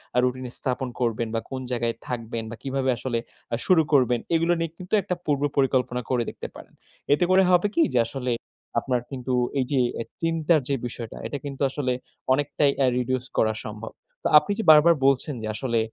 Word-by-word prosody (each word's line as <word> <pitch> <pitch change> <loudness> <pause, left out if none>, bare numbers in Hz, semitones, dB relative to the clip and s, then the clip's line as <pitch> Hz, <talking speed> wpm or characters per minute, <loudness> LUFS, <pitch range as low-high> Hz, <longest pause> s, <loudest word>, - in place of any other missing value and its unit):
আ - - +1
routine 125 0 -1
স্থাপন 130 -1 -2
করবেন 115 -1 0
বা - - +2
কোন 130 -1 -4
জায়গায় 120 -1 0
থাকবেন 115 -2 -4
বা 115 - -5
কিভাবে 135 -1 -1
আসলে 120 -2 -2 0.3
আ - - +4
শুরু 180 -3 +5
করবেন 125 -3 +4 0.2
এগুলা 165 +1 +3
নিয়ে 165 -1 -2
কিন্তু 180 +3 -10
একটা 180 - -2
পূর্ব 145 -2 +1 0.2
পরিকল্পনা 130 -2 +1
করে 125 -2 +1
দেখতে - - -7
পারেন। - - -13 0.4
এতে 145 - +2
করে 190 +1 +6
হবে 180 +3 +4
কি? 335 - +4
যে 120 - +4
আসলে 125 0 -3 0.5
আপনার 125 0 -1
কিন্তু 130 -1 -3 0.3
এই 130 - +1
যে 135 - +2 0.2
অ্যা 115 - -3 0.2
চিন্তার 165 -1 +2
যে 140 - +2
বিষয়টা, 115 -2 -7
এটা 145 - -4
কিন্তু 140 0 -6
আসলে 130 -2 -1 0.4
অনেকটাই 145 +1 +2
অ্যা 135 -2 +3
reduce 130 +1 -1
করা 110 0 +3
সম্ভব। 105 +1 -7 0.3
তো - - +2
আপনি 205 - +3
যে - - 0
বারবার 155 +2 +7
বলছেন 140 +2 +2
যে 110 - -4
আসলে 120 -1 0
130 Hz, 195 wpm, -25 LUFS, 120-145 Hz, 0.5 s, বারবার